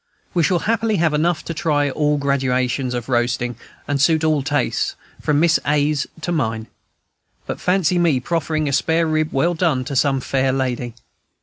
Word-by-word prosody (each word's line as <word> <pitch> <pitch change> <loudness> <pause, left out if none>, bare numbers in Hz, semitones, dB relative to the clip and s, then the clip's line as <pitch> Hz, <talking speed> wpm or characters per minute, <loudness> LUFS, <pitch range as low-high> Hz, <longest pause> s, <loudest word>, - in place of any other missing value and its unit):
We 175 - +2
shall 175 +3 +2
happily 225 -1 +1
have 160 -4 +1
enough 165 +3 0
to 165 - -4
try 145 -3 0
all 150 +1 +1
gradations 130 -2 0
of 120 -1 -4
roasting, 120 -1 0 0.3
and 145 -1 0
suit 160 +1 +3
all 155 -2 +2
tastes, 145 -2 -1 0.3
from 145 -1 +1
Miss 170 +1 +4
A.'s 150 0 +1
to 175 - -3
mine. 115 -9 -1 0.8
But - - -5
fancy 180 -1 +2
me 165 -7 +3
proffering 155 +1 -1
a 140 - -1
spare 165 +4 +2
rib, 155 -1 0
well 165 +6 +1
done, 160 -7 0
to 140 0 -4
some 135 0 +2
fair 130 +1 0
lady! 125 -3 -2
145 Hz, 175 wpm, -20 LUFS, 130-165 Hz, 0.8 s, Miss